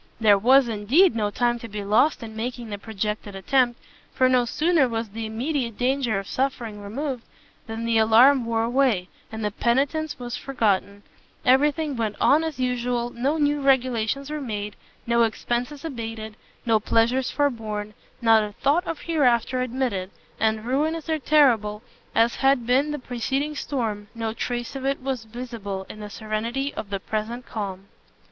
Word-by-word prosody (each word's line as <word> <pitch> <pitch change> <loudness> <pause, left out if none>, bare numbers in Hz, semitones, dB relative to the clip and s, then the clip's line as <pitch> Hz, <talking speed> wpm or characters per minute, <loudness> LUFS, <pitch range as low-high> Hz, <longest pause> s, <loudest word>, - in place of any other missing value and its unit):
There 210 -3 +5
was, 260 +4 +5
indeed, 235 - +3
no 210 -2 0
time 240 +3 0
to 230 - -8
be 205 -1 -5
lost 225 +8 +2
in 220 -1 -8
making 235 0 -5
the 205 - -4
projected 210 -1 -4
attempt, 240 +5 +1 0.4
for 255 - +4
no 255 -1 +3
sooner 310 +1 +2
was 225 -1 -3
the 220 +2 -5
immediate 235 0 -2
danger 250 -4 +1
of 195 - -4
suffering 240 -6 -2
removed, 250 +4 -4 0.4
than 225 +1 -4
the 230 -1 +3
alarm 240 +5 +6
wore 230 -1 0
away, 235 -6 +1 0.2
and 220 -1 -4
the 210 - 0
penitence 280 +8 0
was 245 -1 -5
forgotten; 205 -6 -1 0.4
every 270 +4 +5
thing 300 -2 -3
went 220 -3 -2
on 305 +3 +4
as 320 -3 -4
usual, 245 -1 -1
no 270 +7 0
new 290 -1 +1
regulations 265 0 +1
were 305 -1 -3
made, 210 -5 -4 0.3
no 235 0 +2
expences 240 +6 -1
abated, 225 -6 -6 0.3
no 225 -2 +3
pleasures 235 +4 +2
forborn, 215 -7 -2 0.3
not 225 -1 +6
a 210 -1 -6
thought 310 - +1
of 330 - -4
hereafter 255 -6 +2
admitted: 245 -7 -2 0.3
and 220 0 +1
ruinous 310 +6 -1
and 315 -3 -1
terrible 230 -8 +3 0.3
as 230 +1 +3
had 270 -3 +3
been 260 +5 +2
the 295 - -2
preceding 265 +3 -2
storm, 225 -8 -3
no 225 -1 -3
trace 240 +2 -4
of 270 - -5
it 275 +1 0
was 260 -4 -3
visible 220 -5 -6
in 215 - -11
the 210 -1 -7
serenity 230 +6 -3
of 205 - -6
the 200 -1 -2
present 220 +5 -4
calm. 195 -3 -5
235 Hz, 165 wpm, -24 LUFS, 220-270 Hz, 0.4 s, alarm